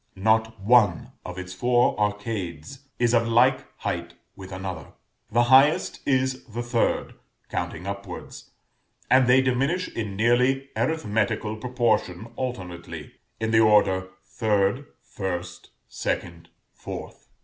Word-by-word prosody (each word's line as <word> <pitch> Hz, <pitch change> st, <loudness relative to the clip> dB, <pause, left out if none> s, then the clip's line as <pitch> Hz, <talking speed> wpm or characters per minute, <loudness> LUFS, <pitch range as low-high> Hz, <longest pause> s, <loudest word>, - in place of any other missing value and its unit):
Not 110 Hz, +3 st, +1 dB
one 105 Hz, -5 st, +3 dB
of 90 Hz, 0 st, -7 dB
its 95 Hz, 0 st, -6 dB
four 120 Hz, +5 st, +2 dB
arcades 105 Hz, -, -3 dB
is 120 Hz, -1 st, +2 dB
of 115 Hz, -1 st, +3 dB
like 125 Hz, +3 st, +3 dB
height -, -, -3 dB, 0.2 s
with 95 Hz, -1 st, -10 dB
another. 95 Hz, -2 st, -6 dB, 0.4 s
The 120 Hz, +2 st, +4 dB
highest 135 Hz, +5 st, +4 dB
is 130 Hz, -1 st, +1 dB
the 120 Hz, 0 st, -5 dB
third, 120 Hz, -1 st, 0 dB, 0.4 s
counting 90 Hz, -, -4 dB
upwards; 100 Hz, -2 st, -7 dB, 0.6 s
and 130 Hz, -1 st, +6 dB
they 130 Hz, +1 st, +6 dB
diminish 135 Hz, +8 st, 0 dB
in 105 Hz, -4 st, -4 dB
nearly 125 Hz, +5 st, +2 dB
arithmetical 110 Hz, -7 st, -1 dB
proportion 110 Hz, -4 st, -1 dB
alternately; 95 Hz, -10 st, -6 dB, 0.3 s
in 110 Hz, 0 st, -1 dB
the 110 Hz, -, +5 dB
order 100 Hz, -4 st, +4 dB, 0.2 s
3rd, 105 Hz, +4 st, 0 dB, 0.3 s
1st, 90 Hz, -2 st, -4 dB, 0.2 s
2nd, 85 Hz, -1 st, -3 dB, 0.4 s
4th. -, -, -8 dB
110 Hz, 115 wpm, -25 LUFS, 95-125 Hz, 0.6 s, and